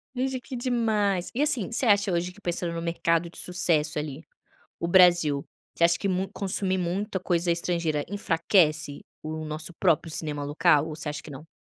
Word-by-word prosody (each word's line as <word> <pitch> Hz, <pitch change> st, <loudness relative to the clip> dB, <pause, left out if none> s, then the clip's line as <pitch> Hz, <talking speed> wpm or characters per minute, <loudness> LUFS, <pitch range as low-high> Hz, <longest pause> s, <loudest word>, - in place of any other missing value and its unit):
Gente 260 Hz, 0 st, -1 dB
que 245 Hz, +1 st, -7 dB
demais 215 Hz, -7 st, 0 dB
e 265 Hz, -, -1 dB
assim 240 Hz, -8 st, 0 dB
você 245 Hz, -, -1 dB
acha 205 Hz, -2 st, +4 dB
hoje 180 Hz, +1 st, -1 dB
que 205 Hz, -, -18 dB
pensando 175 Hz, -1 st, -2 dB
no 165 Hz, -, -4 dB
mercado 170 Hz, 0 st, 0 dB
de -, -, -16 dB
sucesso 160 Hz, -4 st, 0 dB
ali 150 Hz, +1 st, -5 dB, 0.6 s
o 170 Hz, -, -1 dB
Brasil 175 Hz, -6 st, +5 dB, 0.3 s
você 170 Hz, -, +3 dB
acha 170 Hz, 0 st, +4 dB
que 200 Hz, -, -2 dB
mu 190 Hz, +1 st, -1 dB
consumir 190 Hz, -1 st, -1 dB
muita 190 Hz, +2 st, -2 dB
coisa 175 Hz, -1 st, 0 dB
estrangeira 170 Hz, -3 st, -1 dB
enfraquece 165 Hz, -6 st, +1 dB, 0.2 s
o 155 Hz, 0 st, -5 dB
nosso 155 Hz, +2 st, -6 dB
próprio 165 Hz, +1 st, +1 dB
cinema 150 Hz, -2 st, -3 dB
local 150 Hz, +1 st, +3 dB
ou 155 Hz, -, -6 dB
você 150 Hz, -1 st, -4 dB
acha 145 Hz, -2 st, -6 dB
que 155 Hz, -, -11 dB
não? 145 Hz, +3 st, -10 dB
170 Hz, 185 wpm, -26 LUFS, 155-195 Hz, 0.6 s, Brasil